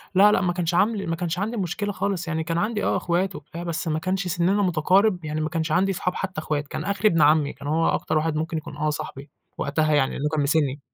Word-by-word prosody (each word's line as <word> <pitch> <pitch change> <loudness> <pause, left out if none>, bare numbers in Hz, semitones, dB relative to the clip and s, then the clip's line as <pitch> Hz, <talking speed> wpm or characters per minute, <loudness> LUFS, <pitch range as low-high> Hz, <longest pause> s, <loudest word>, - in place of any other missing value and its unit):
لأ، 205 +3 +7
لأ - - +2
ما 180 -2 +1
كانش 175 -1 -1
عم 215 +5 +3
لي 200 - -4
ما 165 - -1
كانش 175 +1 -3
عندي 220 +4 -2
مشكلة 200 +2 -2
خالص، 185 -2 -2
يعني 160 -1 -1
كان 165 0 -2
عندي 210 +3 -1
آه - - +1
إخوات 185 +1 0
وبتاع، 155 +4 -8
بس 170 0 -3
ما 155 0 0
كانش 185 +2 -1
سننا 180 +4 +1
متقارب، 180 +1 +2
يعني 155 +1 -2
ما 155 - -1
كانش 160 -1 -2
عندي 190 +4 +3
أصحاب، 180 -1 -2
حتّى 185 -5 -3
إخوات، 150 -2 -2
كان - - -5
آخري 200 +1 +1
ابن 165 -6 +3
عمي، 150 -1 +4
كان 145 - -9
هو 160 +2 +2
أكتر - - 0
واحد 155 0 0
ممكن 160 +1 -2
يكون 150 -1 -7
آه 155 +1 0
صاحبي 140 -1 -6 0.3
وقتها 155 +2 +1
يعني، 135 -3 +3
لإنه 150 +2 -2
كان 155 - +1
من 145 - +2
سني. 145 -2 +1
170 Hz, 260 wpm, -24 LUFS, 155-190 Hz, 0.3 s, لأ